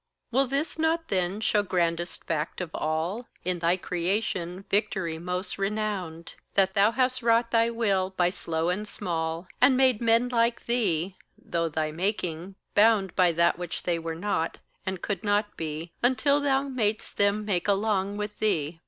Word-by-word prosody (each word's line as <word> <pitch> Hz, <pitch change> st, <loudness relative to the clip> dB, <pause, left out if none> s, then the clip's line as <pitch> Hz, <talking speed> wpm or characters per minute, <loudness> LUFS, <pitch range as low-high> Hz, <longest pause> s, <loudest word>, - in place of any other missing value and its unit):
Will 270 Hz, +3 st, +3 dB
this 280 Hz, +5 st, -2 dB
not 320 Hz, +1 st, +1 dB
then 185 Hz, 0 st, 0 dB
show 210 Hz, -1 st, +3 dB
grandest 175 Hz, -3 st, -1 dB
fact 155 Hz, -2 st, -2 dB
of 180 Hz, -3 st, -4 dB
all 165 Hz, +10 st, -2 dB, 0.2 s
In 180 Hz, -1 st, 0 dB
thy 170 Hz, +2 st, +2 dB
creation 180 Hz, 0 st, -2 dB
victory 190 Hz, -6 st, 0 dB
most 180 Hz, +3 st, -4 dB
renowned 195 Hz, -5 st, -3 dB, 0.2 s
That 190 Hz, -1 st, +3 dB
thou 200 Hz, +2 st, +5 dB
hast 255 Hz, +2 st, +1 dB
wrought 230 Hz, 0 st, +3 dB
thy 230 Hz, 0 st, +4 dB
will 200 Hz, -5 st, +1 dB
by 180 Hz, -2 st, +1 dB
slow 165 Hz, -2 st, -2 dB
and 205 Hz, +4 st, -2 dB
small, 165 Hz, -3 st, -3 dB
And 255 Hz, +1 st, +6 dB
made 255 Hz, -4 st, +3 dB
men 230 Hz, +1 st, +3 dB
like 235 Hz, -1 st, +1 dB
thee, 190 Hz, -7 st, 0 dB, 0.2 s
though 165 Hz, -1 st, -2 dB
thy 155 Hz, 0 st, -1 dB
making 180 Hz, 0 st, -3 dB, 0.2 s
bound 210 Hz, -3 st, +4 dB
By 180 Hz, -2 st, +4 dB
that 170 Hz, +1 st, +2 dB
which 175 Hz, -1 st, -5 dB
they 170 Hz, -2 st, 0 dB
were 165 Hz, 0 st, -4 dB
not, 170 Hz, -2 st, -1 dB, 0.3 s
and 190 Hz, -1 st, -3 dB
could 205 Hz, +1 st, -2 dB
not 205 Hz, 0 st, +1 dB
be 160 Hz, +1 st, -5 dB
Until 280 Hz, +4 st, +3 dB
thou 275 Hz, -1 st, +2 dB
mad'st 225 Hz, -6 st, -2 dB
them 205 Hz, +1 st, +2 dB
make 190 Hz, -4 st, 0 dB
along 200 Hz, -1 st, +1 dB
with 210 Hz, 0 st, -5 dB
thee? 165 Hz, -6 st, 0 dB
195 Hz, 165 wpm, -27 LUFS, 170-225 Hz, 0.3 s, And